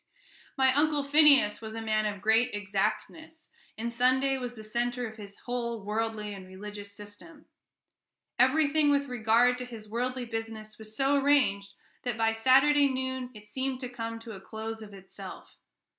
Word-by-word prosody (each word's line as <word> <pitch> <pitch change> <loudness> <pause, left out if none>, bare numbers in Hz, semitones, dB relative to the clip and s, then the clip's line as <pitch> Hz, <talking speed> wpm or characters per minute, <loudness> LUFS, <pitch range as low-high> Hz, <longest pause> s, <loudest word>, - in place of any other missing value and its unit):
My 265 -1 +4
Uncle 295 0 +2
Phineas 280 -7 +5
was 220 0 -7
a - - -4
man 215 -1 0
of 205 -2 -5
great 225 +2 +3
exactness, 215 +11 -3 0.3
and 235 +1 -4
Sunday 260 +3 +2
was 245 -1 -5
the 220 - -9
centre 240 +2 -2
of 220 0 -11
his 200 -2 -11
whole 235 -3 -3
worldly 215 0 -2
and 190 -2 -10
religious 205 +2 -9
system. 205 +10 -13 0.9
Everything 295 +3 +4
with 280 0 +2
regard 245 0 +2
to 250 - -4
his 225 -3 -10
worldly 250 +3 -2
business 225 -2 -6
was 220 0 -10
so 275 +1 +3
arranged 200 -9 +2 0.3
that 245 -3 -3
by 225 0 +2
Saturday 270 +5 +5
noon 260 -1 -3
it 210 0 -12
seemed 260 +4 -3
to 250 - -4
come 230 -2 -5
to 225 0 -10
a 195 -3 -9
close 220 +2 -6
of 210 -1 -10
itself. 195 -1 -11
230 Hz, 165 wpm, -29 LUFS, 215-260 Hz, 0.9 s, Phineas